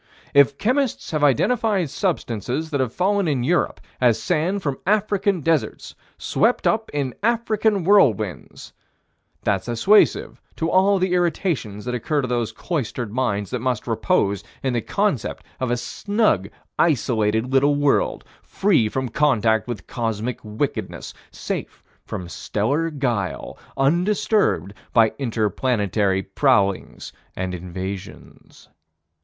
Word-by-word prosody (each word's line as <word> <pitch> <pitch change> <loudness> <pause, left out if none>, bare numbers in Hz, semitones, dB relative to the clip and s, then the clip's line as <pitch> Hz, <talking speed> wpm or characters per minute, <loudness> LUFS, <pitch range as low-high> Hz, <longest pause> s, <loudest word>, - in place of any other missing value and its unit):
If 140 0 +5
chemists 255 +2 0
have 155 -2 -1
identified 195 - +2
substances 150 - -2
that 140 - 0
have 130 -3 0
fallen 195 +3 +1
in 135 -5 0
Europe 170 +7 +1 0.2
as 120 -3 +4
sand 185 - 0
from 140 -3 -2
African 200 -3 +1
deserts, 160 -1 -1 0.2
swept 230 +4 +1
up 220 0 +1
in 140 -4 -2
African 220 -3 +1
whirlwinds, 120 - +1 0.7
that's 100 0 0
assuasive 190 - +3
to 165 +1 -1
all 195 +2 +4
the 185 -1 0
irritations 160 - -1
that 125 - -3
occur 140 +4 -1
to - - -1
those 120 -2 -1
cloistered 125 - -4
minds 105 -6 -1
that 125 - -2
must 125 -2 -1
repose 110 - 0 0.2
in 130 -2 0
the 120 - 0
concept 200 - -1 0.2
of 130 - -1
a 120 - +1
snug, 200 - 0 0.3
isolated, 115 -5 +1
little 140 +2 +4
world, 145 -1 +1 0.2
free 170 - +1
from 130 +3 -2
contact 115 -5 +2
with 120 -6 -5
cosmic 115 0 -3
wickednesses, 105 0 -4 0.2
safe - - -6 0.2
from 90 - -5
stellar 140 - -1
guile, 120 - -2 0.2
undisturbed 170 - +1 0.2
by 115 -2 +4
inter 115 -5 0
planetary 100 -4 0
prowlings 100 -3 0 0.2
and 95 0 -3
invasions. 95 +2 -8
130 Hz, 125 wpm, -22 LUFS, 110-180 Hz, 0.7 s, If